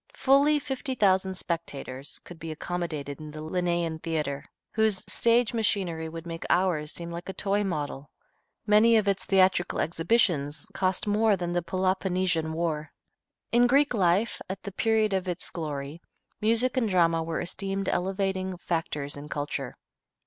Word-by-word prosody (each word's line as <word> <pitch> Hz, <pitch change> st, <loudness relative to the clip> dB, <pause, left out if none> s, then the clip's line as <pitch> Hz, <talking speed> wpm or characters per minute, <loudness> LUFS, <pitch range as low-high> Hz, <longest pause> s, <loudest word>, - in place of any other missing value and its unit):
Fully 285 Hz, -, +4 dB
fifty 270 Hz, -2 st, -2 dB
thousand 190 Hz, -3 st, +2 dB
spectators 145 Hz, -6 st, -4 dB
could 175 Hz, -2 st, -12 dB
be 165 Hz, -1 st, -5 dB
accommodated 155 Hz, -3 st, -4 dB
in 155 Hz, -1 st, -8 dB
the 155 Hz, +1 st, -8 dB
Lenæan 170 Hz, -1 st, -1 dB
Theatre, 150 Hz, -4 st, -2 dB, 0.3 s
whose 220 Hz, -3 st, +2 dB
stage 235 Hz, 0 st, +3 dB
machinery 185 Hz, -8 st, 0 dB
would 165 Hz, +1 st, -8 dB
make 165 Hz, -1 st, -6 dB
ours 175 Hz, -5 st, +2 dB
seem 170 Hz, 0 st, -5 dB
like 170 Hz, +2 st, -6 dB
a -, -, -3 dB
toy 200 Hz, +1 st, 0 dB
model. 145 Hz, -6 st, -3 dB, 0.6 s
Many 215 Hz, +2 st, +6 dB
of 210 Hz, -2 st, +1 dB
its 195 Hz, -1 st, 0 dB
theatrical 190 Hz, -1 st, +3 dB
exhibitions 165 Hz, -4 st, +1 dB
cost 185 Hz, -1 st, 0 dB
more 210 Hz, 0 st, +3 dB
than 175 Hz, -1 st, -3 dB
the 175 Hz, 0 st, +1 dB
Peloponnesian 185 Hz, -2 st, 0 dB
War. 160 Hz, -2 st, -2 dB, 0.6 s
In 240 Hz, +1 st, +5 dB
Greek 280 Hz, +2 st, +4 dB
life, 195 Hz, +1 st, +2 dB
at 190 Hz, 0 st, -5 dB
the 200 Hz, -, -5 dB
period 220 Hz, +1 st, +2 dB
of 190 Hz, -1 st, -1 dB
its 175 Hz, -2 st, -3 dB
glory, 150 Hz, -1 st, -5 dB, 0.4 s
music 230 Hz, +4 st, +2 dB
and 240 Hz, -3 st, +2 dB
the -, -, -3 dB
drama 165 Hz, -2 st, +3 dB
were 165 Hz, 0 st, -2 dB
esteemed 195 Hz, +2 st, -3 dB
elevating 190 Hz, 0 st, -1 dB
factors 160 Hz, -5 st, -2 dB
in 145 Hz, +1 st, -9 dB
culture. 145 Hz, -3 st, -4 dB
180 Hz, 155 wpm, -27 LUFS, 160-205 Hz, 0.6 s, Many